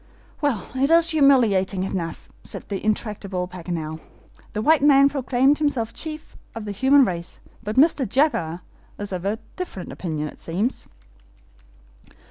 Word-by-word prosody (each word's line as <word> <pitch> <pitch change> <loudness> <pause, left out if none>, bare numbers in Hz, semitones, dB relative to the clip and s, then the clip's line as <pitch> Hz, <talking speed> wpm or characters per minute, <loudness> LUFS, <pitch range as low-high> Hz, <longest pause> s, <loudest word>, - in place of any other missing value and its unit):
"Well, 270 -10 0
it 265 +2 +1
is 335 +1 +6
humiliating 230 -11 +3
enough," 175 -4 -4 0.2
said - - -6
the 195 -2 -4
intractable 205 -4 -2
Paganel. 165 -3 -5 0.5
"The 215 - -2
white 315 +2 +4
man 275 -1 +6
proclaimed 270 +1 +2
himself 250 -7 -1
chief 310 -1 -7 0.2
of 225 -2 -6
the 205 - -4
human 265 +6 +4
race; 175 -4 -5 0.2
but 215 0 -4
Mr. 275 -4 +3
Jaguar 180 - +1 0.4
is 205 -1 -5
of 185 0 -4
a 205 +2 0 0.2
different 355 - -6
opinion 155 -4 -4
it - - -11
seems." 195 +10 -3
215 Hz, 140 wpm, -23 LUFS, 185-275 Hz, 0.5 s, is